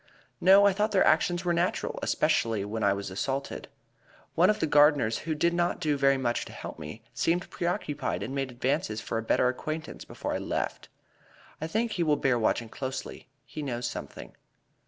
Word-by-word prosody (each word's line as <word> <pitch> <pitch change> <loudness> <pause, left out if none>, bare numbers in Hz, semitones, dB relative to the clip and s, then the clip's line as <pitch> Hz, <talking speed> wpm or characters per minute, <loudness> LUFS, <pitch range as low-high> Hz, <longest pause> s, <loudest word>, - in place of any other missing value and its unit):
"No, 195 +2 +7
I 200 - +5
thought 210 +3 0
their 190 - +4
actions 175 +1 +2
were 175 - +2
natural, 170 +2 -1
especially 110 -3 +1
when 110 +1 -3
I 100 - +4
was 100 -1 -3
assaulted. 135 +8 -3 0.7
One 180 +4 +4
of 215 - +2
the - - +1
gardeners, 145 -6 +4
who 155 - +1
did 170 +3 +2
not 175 0 0
do 155 -4 +1
very 135 -1 +3
much 120 -2 -1
to - - -10
help - - -8
me, - - -8
seemed 175 +3 0
preoccupied 145 - -2
and 120 +6 -5
made 135 -1 -2
advances 125 -2 -1
for 115 - -3
a - - -3
better 115 +2 +2
acquaintance 155 +5 -4
before - - -5
I - - -1
left. - - -3 0.7
I 160 - -2
think 225 +6 -1
he 180 - -2
will 150 -2 +3
bear 130 -3 +2
watching 115 +1 +1
closely; 130 0 -6 0.2
he 155 - -7
knows 120 -4 -3
something." - - -8
145 Hz, 190 wpm, -28 LUFS, 120-170 Hz, 0.7 s, No